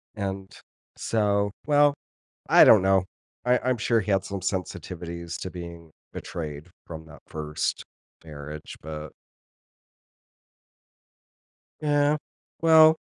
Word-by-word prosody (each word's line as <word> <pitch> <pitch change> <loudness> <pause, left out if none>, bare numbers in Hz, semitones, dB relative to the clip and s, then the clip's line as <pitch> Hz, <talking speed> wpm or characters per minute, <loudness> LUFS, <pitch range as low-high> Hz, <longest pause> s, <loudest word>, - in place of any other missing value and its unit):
And, 95 -2 -4 0.5
so, 100 -2 +1 0.2
well, 145 -1 +5 0.6
I - - +9
don't 105 -4 +8
know. 95 -1 +3 0.4
I 125 0 +4
I'm 130 0 0
sure 115 0 +2
he 100 - -2
had 95 -1 +2
some 100 0 -5
sensitivities 85 -2 -4
to 95 - -4
being 85 -2 -9 0.2
betrayed 75 -1 -6 0.2
from 80 -1 -8
that 80 - -14
1st 75 0 -3 0.4
marriage, 75 0 -8
but 75 -1 -7 2.7
Yeah, 145 0 +3 0.4
well, 160 -1 +8
95 Hz, 105 wpm, -26 LUFS, 80-115 Hz, 2.7 s, I